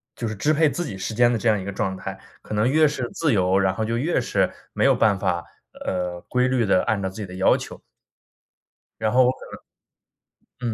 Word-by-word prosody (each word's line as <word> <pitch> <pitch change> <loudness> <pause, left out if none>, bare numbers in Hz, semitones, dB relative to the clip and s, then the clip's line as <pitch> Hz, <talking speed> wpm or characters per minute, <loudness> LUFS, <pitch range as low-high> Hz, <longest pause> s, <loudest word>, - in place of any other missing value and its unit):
就 115 - -4
是 110 - -4
支 150 +10 +1
配 155 0 +3
自 175 +5 -3
己 100 -10 -6
时 95 +4 -4
间 120 +2 +4
的 115 - 0
这 115 - -1
样 105 -2 +2
一 - - -6
个 100 - -4
状 95 -1 -2
态， - - -7 0.2
可 - - -7
能 105 +4 +2
越 155 +3 +4
是 130 -5 -3
自 155 -4 +1
由， 95 -1 +2
然 95 -1 +2
后 110 - -2
就 115 +1 -1
越 155 +8 +1
是 - - 0 0.2
没 - - 0
有 - - +6
办 105 -3 +3
法， 85 -2 -1 0.4
呃， 90 -1 -2
规 125 0 +2
律 125 -3 +1
地 95 -2 +3
按 110 -2 0
照 95 - -2
自 95 - -14
己 - - -3
的 90 -1 -10
要 95 +1 +4
求。 - - -9 1.2
然 110 - +1
后 130 +1 +5
我 125 - +4
可 - - -12 1.2
能 120 -3 -2
110 Hz, 255 characters per minute, -23 LUFS, 95-125 Hz, 1.2 s, 有